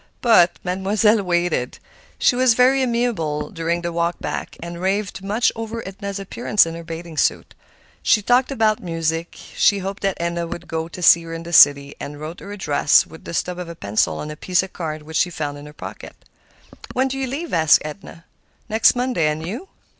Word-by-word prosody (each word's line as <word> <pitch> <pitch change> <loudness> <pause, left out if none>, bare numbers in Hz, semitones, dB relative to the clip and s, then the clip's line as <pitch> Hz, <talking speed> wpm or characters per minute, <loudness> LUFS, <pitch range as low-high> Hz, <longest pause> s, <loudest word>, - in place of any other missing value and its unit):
But 180 -8 +5
Mademoiselle 205 +4 +2
waited. 175 -8 -1 0.4
She 245 - +3
was 250 -2 +4
very 260 +2 +4
amiable 230 - -1
during 170 -1 -2
the 170 0 -3
walk 170 +1 0
back, - - -5
and 170 +1 -7
raved 195 +1 -1
much 210 +4 +1
over 225 -1 -5
Edna's 200 +1 -6
appearance 200 +1 +1
in 165 - -5
her 170 0 -7
bathing 165 -1 -8
suit. - - 0 0.5
She 210 - +3
talked 245 +5 +3
about 220 -4 +1
music. 165 -1 -3 0.2
She 200 - +4
hoped 195 +1 -5
that 195 -2 -1
Edna 170 0 -2
would 175 +1 -7
go 160 0 -3
to 175 +1 -8
see 170 - +7
her 165 0 -8
in 165 - -7
the 170 +1 -8
city, 140 -2 +6
and 145 0 -7
wrote 155 +3 -7
her 200 - -9
address 155 -7 +3
with 160 - -14
the - - -7
stub 180 +2 -2
of 175 -2 -6
a 170 - -7
pencil 100 -5 0
on 150 - -5
a - - -7
piece 180 +3 +1
of 190 - -9
card 155 -3 -5
which 155 +1 -4
she 180 - +2
found 145 -4 -4
in 145 - -11
her - - -11
pocket. 150 - -9 0.8
"When 260 +1 +1
do 270 0 -4
you 265 - -1
leave?" 295 +6 -5
asked 160 -3 +5
Edna. 165 +1 -9 0.4
"Next 220 +3 +4
Monday; 245 -10 0
and 155 +1 -2
you?" 240 - -6
175 Hz, 205 wpm, -21 LUFS, 165-215 Hz, 0.8 s, see